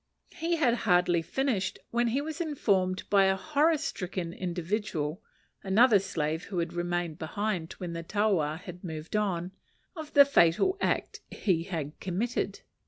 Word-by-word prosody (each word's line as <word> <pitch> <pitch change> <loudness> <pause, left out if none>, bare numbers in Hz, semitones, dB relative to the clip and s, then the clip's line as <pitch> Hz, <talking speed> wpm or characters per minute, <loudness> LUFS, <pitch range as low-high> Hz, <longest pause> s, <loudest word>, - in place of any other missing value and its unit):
He 340 0 -1
had 275 -8 +3 0.2
hardly 175 -1 +4
finished, 240 0 -1
when 240 0 +2
he 255 +5 0
was 315 +3 -5
informed 195 - 0
by 200 -1 +6
a 190 0 +3
horror 305 - +2
stricken 185 - -4
individual 175 -2 -3 0.4
another 210 +3 +5
slave 160 -4 -2
who 190 - -6
had 170 0 -1
remained 175 -2 -2
behind 180 0 -2
when 175 -2 -6
the 165 - -4
taua 175 -5 +1
had 180 0 -10
moved 160 +1 -6
on 185 -4 0 0.4
of 315 -3 -8
the 285 -1 +9
fatal 275 - +4
act - - -1
he 170 -5 0
had 160 -5 -5
committed. 195 +7 -2
190 Hz, 150 wpm, -29 LUFS, 170-235 Hz, 0.4 s, the